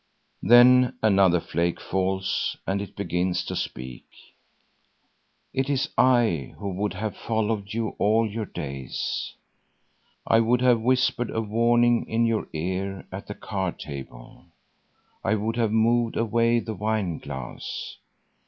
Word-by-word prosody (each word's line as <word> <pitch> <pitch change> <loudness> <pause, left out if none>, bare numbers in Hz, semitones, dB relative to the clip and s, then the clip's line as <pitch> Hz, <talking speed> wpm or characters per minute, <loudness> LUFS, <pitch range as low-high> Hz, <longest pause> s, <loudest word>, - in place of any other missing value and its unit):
Then 125 +2 +6
another 95 -4 +4
flake 85 +1 -1
falls 95 0 -1
and 100 +1 -1
it 100 - -8
begins 90 -2 -1
to - - -4
speak: 65 -1 -5 1.5
"It 135 +1 -1
is 140 +2 0
I 115 - +2
who 100 - -4
would 100 +3 -2
have 110 -1 -3
followed 110 -2 -2
you 115 -2 -1
all 110 +2 +3
your 110 0 -4
days. 70 -3 -4 0.9
I 115 - +4
would 120 +2 +2
have 125 -3 +4
whispered 125 0 +1
a - - -2
warning 120 +2 +2
in 115 +1 +2
your 115 -1 0
ear 95 +4 -3
at 95 +1 -7
the 105 - -6
card 95 -4 -3
table. 65 -4 -9 0.8
I 110 - +2
would 110 +2 -2
have 115 -3 +1
moved 115 +1 +2
away 115 +1 +2
the 110 - -5
wineglass. 90 - -4
110 Hz, 130 wpm, -25 LUFS, 95-115 Hz, 1.5 s, Then